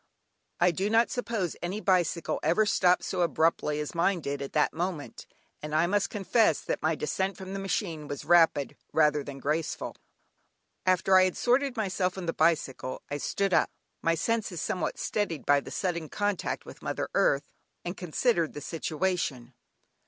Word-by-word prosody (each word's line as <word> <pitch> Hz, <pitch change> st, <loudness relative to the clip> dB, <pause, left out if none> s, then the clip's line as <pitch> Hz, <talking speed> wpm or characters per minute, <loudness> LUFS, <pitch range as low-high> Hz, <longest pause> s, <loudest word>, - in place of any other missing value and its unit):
I 175 Hz, +1 st, +5 dB
do 190 Hz, +5 st, -1 dB
not 230 Hz, +2 st, +3 dB
suppose 225 Hz, -8 st, -2 dB
any 185 Hz, +4 st, -3 dB
bicycle 180 Hz, -5 st, +1 dB
ever 175 Hz, +8 st, +3 dB
stopped 180 Hz, -3 st, +3 dB
so 185 Hz, -, -2 dB
abruptly 160 Hz, -2 st, +1 dB
as 150 Hz, -, -4 dB
mine 175 Hz, +2 st, +2 dB
did 140 Hz, -2 st, -4 dB
at 140 Hz, -, -6 dB
that 150 Hz, -, +2 dB
moment, 170 Hz, -3 st, -4 dB, 0.3 s
and 150 Hz, 0 st, -4 dB
I 160 Hz, +2 st, +4 dB
must 200 Hz, +2 st, +1 dB
confess 200 Hz, -3 st, +2 dB
that -, -, -3 dB
my 160 Hz, +1 st, +1 dB
descent 190 Hz, +6 st, -2 dB
from 190 Hz, 0 st, -7 dB
the 195 Hz, -, -3 dB
machine 175 Hz, -6 st, -2 dB
was 145 Hz, -1 st, -6 dB
rapid 165 Hz, -5 st, +4 dB, 0.2 s
rather 150 Hz, -2 st, +3 dB
than 140 Hz, -1 st, -8 dB
graceful. 150 Hz, +3 st, -2 dB, 0.9 s
After 185 Hz, +1 st, +4 dB
I 185 Hz, -, +6 dB
had 185 Hz, -, -2 dB
sorted 255 Hz, +1 st, +2 dB
myself 190 Hz, -3 st, -1 dB
and 180 Hz, -2 st, -5 dB
the 165 Hz, -, 0 dB
bicycle, 135 Hz, -6 st, 0 dB
I 145 Hz, -, -2 dB
stood 195 Hz, +5 st, -1 dB
up, -, -, +4 dB, 0.3 s
my 165 Hz, 0 st, +2 dB
senses 210 Hz, -1 st, -1 dB
somewhat 180 Hz, +2 st, -2 dB
steadied 175 Hz, -9 st, -2 dB
by 145 Hz, 0 st, +5 dB
the -, -, -9 dB
sudden 170 Hz, -4 st, -2 dB
contact 205 Hz, -2 st, -2 dB
with -, -, -12 dB
mother -, -, -3 dB
earth, 140 Hz, +1 st, +2 dB, 0.3 s
and 175 Hz, +2 st, -3 dB
considered 175 Hz, 0 st, 0 dB
the 145 Hz, -, -7 dB
situation. 160 Hz, -7 st, -2 dB
175 Hz, 170 wpm, -28 LUFS, 155-195 Hz, 0.9 s, I